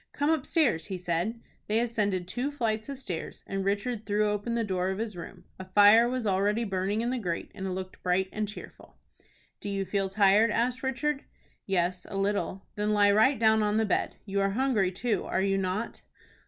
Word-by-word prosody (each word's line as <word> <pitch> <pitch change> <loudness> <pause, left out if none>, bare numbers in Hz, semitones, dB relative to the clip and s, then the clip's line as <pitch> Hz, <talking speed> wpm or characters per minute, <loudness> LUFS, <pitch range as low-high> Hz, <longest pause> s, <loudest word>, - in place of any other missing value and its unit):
"Come 290 +2 +1
upstairs," 300 - +1
he 190 -2 -4
said. 180 +6 -2 0.3
They 215 +2 +2
ascended 205 -6 -1
two 250 +9 -2
flights 225 -4 -2
of 275 - -5
stairs, 185 -11 -6
and 195 0 -3
Richard 210 +3 -1
threw 210 0 +1
open 210 +3 -2
the 230 - +1
door 185 -3 -1
of 190 - -2
his 220 -2 -4
room. 170 - -9 0.2
A 185 - -6
fire 205 +5 +6
was 255 -2 -2
already 205 +3 +1
burning 195 +1 -1
in 240 +1 -1
the 255 - -1
grate, 175 -6 -3
and 190 -1 -5
it - - -2
looked 185 0 -6
bright 185 +1 +1
and 215 0 -2
cheerful. 210 - -11 0.6
"Do 205 - -5
you 195 -1 -2
feel 195 +1 -1
tired?" 200 +3 +4
asked 240 +4 0
Richard. 275 +2 -1 0.4
"Yes, 180 -1 0
a 195 - -4
little." 195 -1 -1
"Then 210 0 0
lie 205 -1 +5
right 220 +7 +4
down 220 -1 +4
on 210 0 +1
the 220 - +2
bed. 205 - 0
You 200 -1 -1
are 195 - +2
hungry 215 -4 +1
too, 210 +1 -1
are 190 - 0
you 195 0 +1
not?" 195 +4 -3
205 Hz, 205 wpm, -28 LUFS, 190-230 Hz, 0.6 s, fire